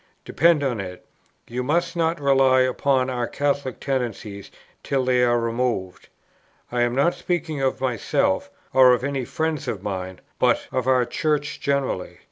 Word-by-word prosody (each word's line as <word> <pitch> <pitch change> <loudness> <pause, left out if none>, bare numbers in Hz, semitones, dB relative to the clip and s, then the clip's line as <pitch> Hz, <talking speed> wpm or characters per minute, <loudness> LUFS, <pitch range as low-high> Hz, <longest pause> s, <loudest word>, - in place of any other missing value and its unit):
Depend 165 -2 +3
upon 125 -5 -1
it, 90 -2 -7 0.4
you 125 +2 -3
must 170 +6 0
not 165 0 0
rely 135 -2 +4
upon 130 0 +1
our 125 -2 -2
Catholic 140 -3 -2
tendencies 115 -7 -4 0.3
till 135 -2 -1
they 125 -1 +3
are 120 -1 +3
removed. 115 -5 -2 0.6
I 120 0 0
am 120 0 +1
not 140 +6 +3
speaking 160 -5 -3
of 135 -1 0
myself, 275 - 0 0.2
or 130 -1 +7
of 125 - 0
any 135 -2 -2
friends 160 +1 -2
of 100 -3 -4
mine; 95 -2 -4 0.2
but - - +2
of 130 -1 -1
our 130 -2 +4
Church 145 +2 -1
generally. 140 -9 -2
130 Hz, 155 wpm, -23 LUFS, 120-145 Hz, 0.6 s, or